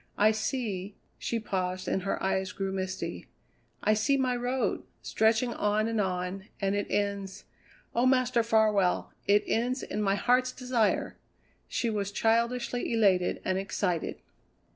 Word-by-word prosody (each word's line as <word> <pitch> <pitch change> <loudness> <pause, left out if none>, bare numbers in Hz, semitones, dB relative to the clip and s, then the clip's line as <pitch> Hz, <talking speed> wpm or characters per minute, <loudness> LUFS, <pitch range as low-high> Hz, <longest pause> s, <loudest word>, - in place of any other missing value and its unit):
I 210 +1 +5
see" 215 -4 -3 0.2
she 230 - -1
paused 185 -3 -2
and 190 - 0
her 195 - -2
eyes 190 0 0
grew 195 -1 -2
misty 190 0 -4 0.6
"I 215 - +4
see 245 +6 +2
My 255 -2 +1
Road, 250 +2 -1 0.2
stretching 225 +2 +2
on 210 +1 +1
and 225 -2 0
on, 185 +1 -3
and 195 -1 0
it 205 0 -1
ends 200 -1 -2 0.5
oh, 240 +2 +3
Master 255 -2 +3
Farwell, 215 -5 +2
it 205 +1 +5
ends 250 +3 0
in 210 - -3
my 195 -1 +2
Heart's 255 +4 +2
Desire!" 250 -4 0 0.5
She 235 - -1
was 200 -2 -2
childishly 235 +3 +1
elated 195 -6 +2
and 185 0 +1
excited. 190 -3 -1
210 Hz, 140 wpm, -29 LUFS, 195-235 Hz, 0.6 s, I